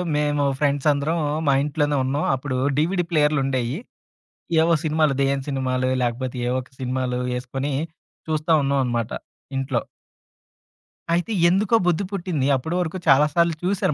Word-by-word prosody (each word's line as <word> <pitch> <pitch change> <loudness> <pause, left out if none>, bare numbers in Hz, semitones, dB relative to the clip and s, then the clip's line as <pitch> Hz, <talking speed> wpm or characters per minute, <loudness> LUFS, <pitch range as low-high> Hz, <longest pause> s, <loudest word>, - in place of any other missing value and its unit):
మేము 145 -1 +1 0.2
ఫ్రెండ్స్ 145 -1 +1
అందరం 145 +4 0 0.3
మా 140 - +5
ఇంట్లోనే 145 0 0
ఉన్నాం. 140 +3 -1
అప్పుడు 130 0 -4 0.2
డీవీడీ 175 +4 +1
ప్లేయర్లుండేయి. 135 -4 +1 0.8
ఏవో 165 +1 +3
సినిమాలు, 155 -2 +2
దేయ్యం 135 0 +1
సినిమాలో 130 -2 0
లాకపోతే 125 +2 -2
ఏవో 125 +1 0
ఒక - - -24
సినిమాలు 130 -1 -2 0.2
ఏసుకొని, 135 +3 -3 0.6
చూస్తా 155 +1 0
ఉన్నాం 140 0 +1
అనమాట. 120 -2 -2 0.5
ఇంట్లో. 135 +1 -1 1.3
అయితే 175 +6 0 0.2
ఎందుకో 200 +5 +2
బుద్ది 175 +3 +1
పుట్టింది. 175 -8 -1
అప్పుడు 160 +7 -3
వరకు 175 +1 -3
చాలా 140 +2 +6
సార్లు 170 0 +2
చూసారు 185 -2 +1
145 Hz, 135 wpm, -23 LUFS, 130-160 Hz, 1.3 s, చాలా